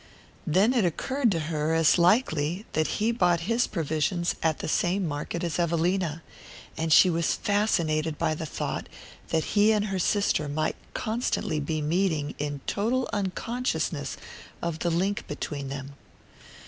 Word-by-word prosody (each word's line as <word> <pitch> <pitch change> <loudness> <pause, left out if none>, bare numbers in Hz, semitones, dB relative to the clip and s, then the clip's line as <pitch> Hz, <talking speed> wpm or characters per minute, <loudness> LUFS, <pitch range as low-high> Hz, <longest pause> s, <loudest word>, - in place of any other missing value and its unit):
Then 195 +10 +4
it 240 -5 +3
occurred 240 - 0
to 170 - 0
her 155 0 -1
as 165 +2 +4
likely 175 - +2
that 155 0 0
he 220 +2 +2
bought 175 -7 +2
his 230 +7 +1
provisions 165 +1 -1
at 160 -2 +1
the - - -5
same 180 +4 +1
market 150 +3 -4
as 170 -1 -2
Evelina; 170 -1 0 0.5
and 160 0 -2
she 170 - +8
was 170 -2 +1
fascinated 165 -7 +1
by 160 - +1
the 155 +1 -4
thought - - -4 0.4
that 160 -1 +1
he 210 +1 +5
and 210 -1 +2
her 195 -2 -2
sister 185 -5 +1
might 155 +2 -1 0.2
constantly 220 -8 -1
be 155 +1 -2
meeting 160 -2 0
in 145 -1 -3
total 245 +5 0
unconsciousness 225 +5 -2 0.4
of 170 -2 -3
the 175 - 0
link 190 +5 -1
between 145 -1 -4
them. 140 0 -6
170 Hz, 150 wpm, -27 LUFS, 155-200 Hz, 0.5 s, she